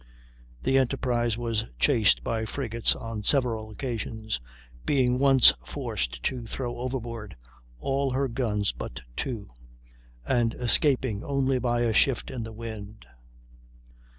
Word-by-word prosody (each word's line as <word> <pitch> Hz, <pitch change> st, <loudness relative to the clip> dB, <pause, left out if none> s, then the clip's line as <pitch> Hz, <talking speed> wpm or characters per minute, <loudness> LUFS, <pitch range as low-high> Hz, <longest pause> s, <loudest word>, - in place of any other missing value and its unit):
The 135 Hz, -, +4 dB
Enterprise 120 Hz, -3 st, 0 dB
was 115 Hz, -2 st, -1 dB
chased 105 Hz, -, +3 dB
by 115 Hz, -1 st, -1 dB
frigates 115 Hz, -2 st, 0 dB
on 115 Hz, -2 st, -5 dB
several 115 Hz, -3 st, +2 dB
occasions; 110 Hz, -, -4 dB, 0.4 s
being 125 Hz, -3 st, +2 dB
once 135 Hz, -2 st, +7 dB
forced -, -, -3 dB
to 125 Hz, -3 st, -2 dB
throw 120 Hz, +1 st, -4 dB
overboard 120 Hz, -, -4 dB, 0.4 s
all 135 Hz, -, 0 dB
her 135 Hz, +1 st, +1 dB
guns 110 Hz, -5 st, 0 dB
but -, -, -7 dB
two, 110 Hz, -, -4 dB, 0.7 s
and 115 Hz, -, +1 dB
escaping 125 Hz, -3 st, +2 dB
only 135 Hz, -2 st, +1 dB
by 120 Hz, -1 st, +1 dB
a 115 Hz, -2 st, +2 dB
shift 125 Hz, +4 st, +2 dB
in 125 Hz, -, -4 dB
the 115 Hz, 0 st, -6 dB
wind. 110 Hz, -2 st, -8 dB
120 Hz, 125 wpm, -27 LUFS, 110-130 Hz, 0.7 s, once